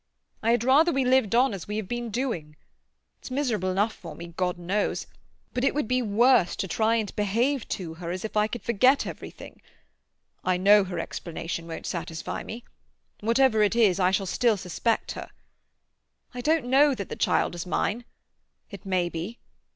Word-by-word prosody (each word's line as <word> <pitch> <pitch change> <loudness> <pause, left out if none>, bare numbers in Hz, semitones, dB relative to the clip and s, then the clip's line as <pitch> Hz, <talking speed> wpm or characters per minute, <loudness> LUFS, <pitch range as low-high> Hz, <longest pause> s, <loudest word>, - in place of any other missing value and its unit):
I 225 - 0
had 235 -1 +3
rather 290 +7 +5
we 270 -4 +1
lived 250 -4 +3
on 250 -1 +4
as 190 -4 -7
we 210 +1 -3
have 215 -3 -3
been 240 +1 -3
doing. 205 - -3 0.6
It's - - -10
miserable 250 -8 -1
enough 205 +4 +1
for 165 -4 -10
me, 170 +1 -9
God 180 -1 -1
knows; 190 +4 -1 0.5
but 250 - -1
it 275 - +2
would 295 -6 0
be 255 +1 +1
worse 230 -2 +3
to 195 - -3
try 220 +5 +1
and 215 -4 -2
behave 230 +6 0
to 170 -4 -4
her 170 - -4
as 185 +4 -4
if 215 - -6
I 210 0 +3
could 240 +2 -6
forget 255 +5 +3
everything. - - -9 0.8
I 185 -1 +1
know 200 +2 +6
her 180 -2 -5
explanation 165 -1 -5
won't 165 - -7
satisfy 165 -2 -4
me. 230 +2 -8 0.6
Whatever 230 0 +3
it 210 +2 +3
is 210 -6 +4
I 180 -1 +4
shall 195 +1 0
still 225 +3 +2
suspect 195 +5 -1
her. - - -7 1.0
I 250 - -5
don't 310 0 +2
know 275 +2 +4
that 200 -5 -6
the - - -4
child - - +1
is 175 +1 -6
mine. 220 +6 -1 0.7
It 200 -1 -10
may 185 -2 +1
be. 175 +8 -5
210 Hz, 185 wpm, -26 LUFS, 185-245 Hz, 1.0 s, know